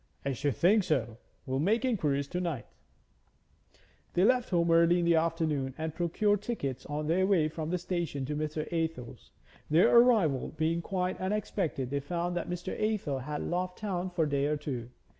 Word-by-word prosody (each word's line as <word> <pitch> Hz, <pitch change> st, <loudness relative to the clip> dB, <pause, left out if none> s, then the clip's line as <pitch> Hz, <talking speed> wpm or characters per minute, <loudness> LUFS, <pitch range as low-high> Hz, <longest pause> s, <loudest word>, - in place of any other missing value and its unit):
'I 140 Hz, -, 0 dB
should 140 Hz, 0 st, -1 dB
think 200 Hz, -, +4 dB
so. 120 Hz, -9 st, -1 dB, 0.3 s
We'll 130 Hz, 0 st, -1 dB
make 220 Hz, -, +2 dB
inquiries 150 Hz, -, 0 dB
to 180 Hz, -, -2 dB
night.' 165 Hz, -8 st, -3 dB, 1.5 s
They 180 Hz, -, +4 dB
left 250 Hz, +3 st, +3 dB
home 170 Hz, -2 st, +2 dB
early 170 Hz, +1 st, +5 dB
in 175 Hz, -, +1 dB
the 170 Hz, -, +4 dB
afternoon 160 Hz, -5 st, 0 dB
and 160 Hz, 0 st, -3 dB
procured 195 Hz, +5 st, +1 dB
tickets 140 Hz, -, -4 dB
on 150 Hz, +1 st, -3 dB
their 180 Hz, +4 st, +2 dB
way 175 Hz, -6 st, +3 dB
from 155 Hz, 0 st, -5 dB
the 180 Hz, -, 0 dB
station 170 Hz, -6 st, -3 dB
to 150 Hz, +3 st, -3 dB
Mr. 155 Hz, 0 st, -2 dB
Athel's. 160 Hz, -7 st, -3 dB, 0.4 s
Their 165 Hz, +9 st, +5 dB
arrival 220 Hz, -, +4 dB
being 165 Hz, +2 st, +1 dB
quite 185 Hz, +1 st, -2 dB
unexpected, 185 Hz, -9 st, -2 dB
they 140 Hz, -, 0 dB
found 175 Hz, +4 st, -3 dB
that 175 Hz, -, -3 dB
Mr. 180 Hz, +1 st, -4 dB
Athel 210 Hz, -11 st, -1 dB
had 150 Hz, +3 st, -4 dB
loft 180 Hz, +1 st, -2 dB
town 185 Hz, -4 st, -3 dB
for 175 Hz, -2 st, 0 dB
a -, -, -2 dB
day 140 Hz, 0 st, +1 dB
or 150 Hz, 0 st, 0 dB
two. 130 Hz, -5 st, -5 dB
165 Hz, 180 wpm, -30 LUFS, 145-180 Hz, 1.5 s, early